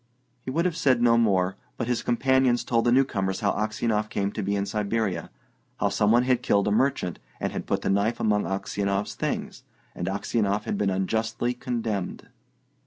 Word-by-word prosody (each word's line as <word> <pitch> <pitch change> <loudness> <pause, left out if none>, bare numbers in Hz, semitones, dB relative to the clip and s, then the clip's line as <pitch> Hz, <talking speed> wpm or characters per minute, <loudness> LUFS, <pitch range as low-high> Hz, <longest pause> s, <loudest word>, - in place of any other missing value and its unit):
He 130 - -7
would 165 +6 0
have 180 -3 0
said 135 -7 +3
no 120 -1 +5
more, 95 -4 +2 0.2
but 120 - -2
his 125 -1 0
companions 130 0 +2
told 115 -1 +1
the 120 - +4
newcomers 105 -7 +1
how 100 -2 +2
Aksionov 110 0 -1
came 100 0 -1
to 105 - -4
be 100 +1 -1
in 100 0 0
Siberia; 105 -4 -1 0.5
how 100 - +2
some 105 +1 +2
one 120 +2 +5
had 125 -1 +2
killed 100 0 +2
a - - +2
merchant, 105 - +1 0.2
and - - -2
had - - -5
put - - -1
the - - 0
knife 100 +4 +1
among 105 -1 +1
Aksionov's 100 +1 -2
things, - - -3 0.3
and 85 - -4
Aksionov 100 +1 0
had - - -2
been 100 -1 +1
unjustly 110 +5 -1
condemned. 115 -6 -3
110 Hz, 185 wpm, -26 LUFS, 100-120 Hz, 0.5 s, no